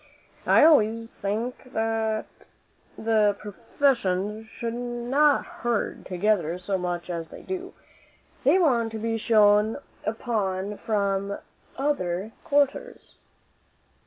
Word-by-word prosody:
I -, -, +6 dB
always 230 Hz, -7 st, +3 dB
think 235 Hz, +5 st, -3 dB
the 220 Hz, -1 st, 0 dB, 0.8 s
professions 210 Hz, 0 st, 0 dB
should 230 Hz, 0 st, -5 dB
not 245 Hz, +5 st, +1 dB
herd 240 Hz, -3 st, -3 dB
together 180 Hz, -3 st, +1 dB
so 180 Hz, +2 st, -3 dB
much 175 Hz, -1 st, -3 dB
as 165 Hz, -1 st, -4 dB
they -, -, -11 dB
do; 375 Hz, 0 st, -5 dB, 0.7 s
they -, -, +5 dB
want 245 Hz, -10 st, +2 dB
to -, -, -3 dB
be 225 Hz, +1 st, -2 dB
shone 210 Hz, -1 st, +4 dB, 0.3 s
upon 210 Hz, -3 st, -2 dB
from 200 Hz, -2 st, -1 dB, 0.4 s
other 215 Hz, -8 st, -1 dB
quarters." 290 Hz, -, -1 dB
220 Hz, 100 wpm, -26 LUFS, 200-240 Hz, 0.8 s, I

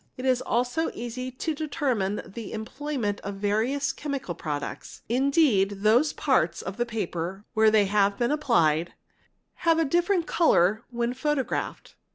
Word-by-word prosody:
It 255 Hz, -, -5 dB
is 255 Hz, -1 st, +2 dB
also 250 Hz, +7 st, 0 dB
easy 245 Hz, +2 st, -5 dB
to 260 Hz, +5 st, -3 dB
determine 270 Hz, -10 st, -1 dB
the 215 Hz, +2 st, -8 dB
employment 225 Hz, -1 st, -3 dB
of 200 Hz, 0 st, -5 dB
various 220 Hz, +8 st, 0 dB
chemical 280 Hz, -11 st, -4 dB
products; 150 Hz, -3 st, -6 dB
indeed 240 Hz, -6 st, +2 dB
those 240 Hz, +8 st, +4 dB
parts 255 Hz, -, +1 dB
of 190 Hz, +1 st, -6 dB
the 240 Hz, 0 st, 0 dB
paper 195 Hz, -3 st, -4 dB
where 220 Hz, 0 st, +5 dB
they 215 Hz, -1 st, +4 dB
have 200 Hz, 0 st, +2 dB
been 240 Hz, +1 st, +1 dB
applied, 170 Hz, -, +2 dB, 0.7 s
have 330 Hz, -2 st, +3 dB
a 325 Hz, -, +2 dB
different 345 Hz, +4 st, +1 dB
colour 215 Hz, -, +3 dB
when 240 Hz, 0 st, -1 dB
photographed. 265 Hz, -1 st, -2 dB
240 Hz, 145 wpm, -26 LUFS, 205-280 Hz, 0.7 s, where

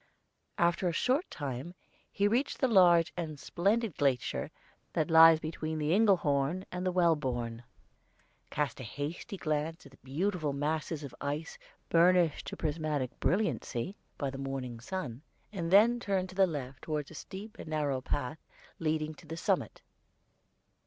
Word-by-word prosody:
After 175 Hz, +1 st, +2 dB
a 170 Hz, -, 0 dB
short 260 Hz, -, +1 dB
time 145 Hz, +4 st, -5 dB, 0.4 s
he 200 Hz, -, +2 dB
reached 245 Hz, +7 st, +1 dB
the 260 Hz, -, +3 dB
large 175 Hz, -7 st, +5 dB
and 155 Hz, -4 st, -4 dB
splendid 200 Hz, -, 0 dB
glacier 135 Hz, -4 st, 0 dB, 0.4 s
that 160 Hz, +1 st, 0 dB
lies 165 Hz, 0 st, +9 dB
between 155 Hz, 0 st, -4 dB
the 150 Hz, 0 st, 0 dB
Engelhorn 180 Hz, -5 st, +2 dB
and 180 Hz, +1 st, -2 dB
Wellborn, 135 Hz, -10 st, +1 dB, 0.9 s
cast 150 Hz, -2 st, -2 dB
a -, -, -6 dB
hasty 145 Hz, -, -5 dB
glance 155 Hz, -1 st, -2 dB
at 140 Hz, -, -13 dB
the 135 Hz, -, -19 dB
beautiful 155 Hz, +2 st, -1 dB
masses 155 Hz, +2 st, -2 dB
of 140 Hz, -, -7 dB
ice 145 Hz, +3 st, -4 dB, 0.3 s
burnished 170 Hz, -1 st, +4 dB
to -, -, -5 dB
prismatic 150 Hz, -4 st, -2 dB
brilliancy 185 Hz, -, -1 dB, 0.2 s
by 140 Hz, -2 st, -2 dB
the 135 Hz, -, -7 dB
morning 135 Hz, -3 st, -4 dB
sun, 130 Hz, -3 st, -5 dB, 0.3 s
and 170 Hz, -4 st, -3 dB
then 225 Hz, +6 st, +6 dB
turned 190 Hz, -4 st, -1 dB
to 185 Hz, -, -11 dB
the 190 Hz, -1 st, +5 dB
left 135 Hz, -5 st, -5 dB
toward 150 Hz, -2 st, -3 dB
a -, -, -10 dB
steep 205 Hz, +7 st, -9 dB
and -, -, -8 dB
narrow 145 Hz, -4 st, -1 dB
path 145 Hz, +3 st, -3 dB, 0.4 s
leading 155 Hz, -1 st, -1 dB
to 155 Hz, +1 st, -16 dB
the 165 Hz, +1 st, -6 dB
summit. 175 Hz, -, -1 dB
160 Hz, 150 wpm, -31 LUFS, 145-185 Hz, 0.9 s, lies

